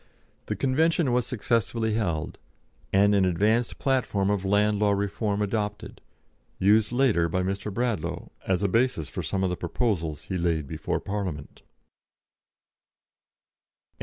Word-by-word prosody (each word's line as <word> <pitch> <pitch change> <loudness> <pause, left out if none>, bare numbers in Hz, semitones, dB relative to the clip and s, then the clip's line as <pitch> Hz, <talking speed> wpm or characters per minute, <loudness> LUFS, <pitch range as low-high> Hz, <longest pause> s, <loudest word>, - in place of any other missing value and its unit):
The - - -2
Convention 155 +2 +2
was 125 -1 +1
successfully 115 -2 0
held, 85 -8 -2 0.5
and 100 +1 +4
an 100 -1 +4
advanced 105 +6 +1
platform 110 -7 +1
of 100 -2 -1
Land 105 +1 +2
Law 105 -1 +3
Reform 100 +1 -1
adopted, 105 0 -3 0.6
used 105 +3 +3
later 120 -10 +2
by 95 +2 0
Mr. 100 +3 -3
Bradlaugh 95 -7 -2 0.2
as 95 +1 +1
a - - +3
basis 115 - +1
for - - -4
some 95 -1 -2
of 95 - +1
the - - -1
proposals 85 - -2
he 95 - -3
laid 85 -3 0
before - - -2
Parliament. 95 -8 -5
100 Hz, 135 wpm, -26 LUFS, 90-115 Hz, 0.6 s, and